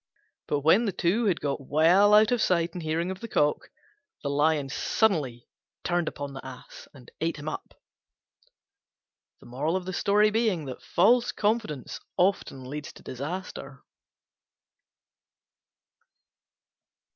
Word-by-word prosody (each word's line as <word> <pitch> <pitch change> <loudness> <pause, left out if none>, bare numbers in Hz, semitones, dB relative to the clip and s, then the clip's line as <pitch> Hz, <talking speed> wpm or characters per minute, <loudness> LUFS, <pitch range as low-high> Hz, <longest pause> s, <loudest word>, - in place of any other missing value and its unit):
But 145 -1 0
when 165 - +4
the 205 - 0
two 190 +7 +1
had 190 -5 +1
got 140 -2 -3
well 180 +8 +5
out 215 +2 +5
of 245 -2 +2
sight 170 -3 +1
and 180 - -6
hearing 165 +3 -1
of 190 - -7
the 230 - -7
Cock, 150 -8 0 0.5
the 140 - -1
Lion 145 0 +2
suddenly 140 - 0 0.4
turned 175 -2 0
upon 140 -1 -5
the 135 - -8
Ass 130 -1 -11
and 130 -4 -16
ate 165 0 -1
him 145 +1 -8
up. 155 - -7 1.6
False 185 - +1
confidence 210 - -2 0.2
often 180 -8 0
leads 145 +3 -6
to - - -16
disaster. 140 0 -6
165 Hz, 110 wpm, -27 LUFS, 145-200 Hz, 1.6 s, well